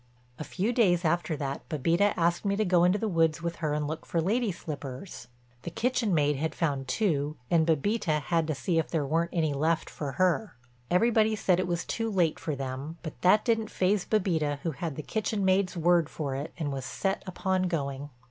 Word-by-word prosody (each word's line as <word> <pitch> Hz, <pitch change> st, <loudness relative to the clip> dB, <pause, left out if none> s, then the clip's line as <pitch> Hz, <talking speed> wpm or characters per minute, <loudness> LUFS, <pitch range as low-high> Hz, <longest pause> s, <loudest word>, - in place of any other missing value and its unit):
A -, -, -3 dB
few 200 Hz, +9 st, -1 dB
days 180 Hz, -7 st, +3 dB
after 165 Hz, -1 st, 0 dB
that 140 Hz, -1 st, -5 dB
Bébita 170 Hz, +6 st, +2 dB
asked 170 Hz, 0 st, +1 dB
me 200 Hz, -1 st, +1 dB
to 215 Hz, +1 st, +1 dB
go 175 Hz, -2 st, +4 dB
into 180 Hz, +3 st, +4 dB
the 220 Hz, -, -2 dB
woods 165 Hz, -3 st, +1 dB
with 170 Hz, 0 st, -3 dB
her 155 Hz, -3 st, -1 dB
and 150 Hz, -1 st, -1 dB
look 155 Hz, +1 st, -5 dB
for 170 Hz, -, -1 dB
lady 215 Hz, +6 st, +1 dB
slippers; 145 Hz, -4 st, -7 dB, 0.3 s
the -, -, -5 dB
kitchen 240 Hz, +2 st, 0 dB
maid 150 Hz, -4 st, +2 dB
had 160 Hz, +3 st, -2 dB
found 140 Hz, -5 st, -1 dB
two 150 Hz, -5 st, 0 dB
and 165 Hz, -2 st, +4 dB
Bébita 165 Hz, +1 st, +1 dB
had 165 Hz, +1 st, 0 dB
to 155 Hz, -, -1 dB
see 165 Hz, +4 st, 0 dB
if 160 Hz, -, -2 dB
there 155 Hz, -4 st, 0 dB
weren't 165 Hz, +4 st, 0 dB
any 160 Hz, -4 st, 0 dB
left 160 Hz, +4 st, 0 dB
for 140 Hz, -3 st, -5 dB
her. 185 Hz, -, +1 dB, 0.3 s
Everybody 220 Hz, +3 st, +3 dB
said 185 Hz, -3 st, +2 dB
it 185 Hz, -, 0 dB
was 170 Hz, -1 st, -2 dB
too 225 Hz, 0 st, -2 dB
late 180 Hz, -6 st, +1 dB
for 155 Hz, -, -3 dB
them, 135 Hz, +4 st, -5 dB
but 155 Hz, -, -8 dB
that 210 Hz, +4 st, +4 dB
didn't 225 Hz, -2 st, +1 dB
faze 190 Hz, +1 st, +1 dB
Bébita 165 Hz, -9 st, +1 dB
who 165 Hz, -, 0 dB
had 155 Hz, +1 st, -4 dB
the 155 Hz, -, -5 dB
kitchen 215 Hz, 0 st, -1 dB
maid's 190 Hz, -1 st, +2 dB
word 170 Hz, -1 st, +3 dB
for 145 Hz, -4 st, -4 dB
it 140 Hz, +4 st, -4 dB
and 150 Hz, -4 st, -2 dB
was 135 Hz, -1 st, -4 dB
set 195 Hz, +8 st, -2 dB
upon 185 Hz, 0 st, 0 dB
going. 140 Hz, -4 st, -3 dB
170 Hz, 210 wpm, -28 LUFS, 150-190 Hz, 0.3 s, go